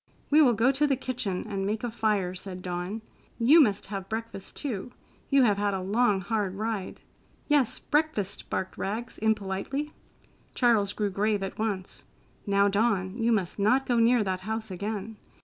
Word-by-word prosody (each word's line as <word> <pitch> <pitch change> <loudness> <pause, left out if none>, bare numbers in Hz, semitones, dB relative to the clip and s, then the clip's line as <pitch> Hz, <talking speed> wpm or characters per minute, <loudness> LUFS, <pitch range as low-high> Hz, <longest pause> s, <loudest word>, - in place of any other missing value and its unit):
"We 305 +2 +7
will 255 -5 +6
go 230 +4 +3
to 285 +2 +2
the 275 - +2
kitchen 245 -8 -3
and 195 -2 -3
make 210 +3 -2
a 240 - -2
fire," 210 -5 0
said 185 0 -7
Dawn. 180 +5 -4 0.3
"You 270 +8 +7
must 205 -7 +2
have 195 -1 -6
breakfast, 220 -3 -5
too. 245 -5 -4 0.4
You 275 -2 +5
have 205 -4 +3
had 205 -1 +1
a - - -2
long, 205 +1 +2
hard 205 -2 -1
ride." 215 -2 -4 0.5
"Yes, 290 -5 +3
breakfast!" 295 -11 -1
barked 185 - -3
Rags 225 +5 -4
impolitely. 220 +7 -1 0.6
Charles 220 -5 +3
grew 205 -2 -1
grave 205 +1 0
at 195 - -6
once. 205 -4 -3 0.4
"Now, 200 0 +4
Dawn, 200 -2 +1
you 230 0 +1
must 200 -4 0
not 250 +7 +3
go 245 - +1
near 230 0 +4
that 185 -2 -2
house 220 +1 -4
again. 205 +3 -4
215 Hz, 170 wpm, -28 LUFS, 195-240 Hz, 0.6 s, We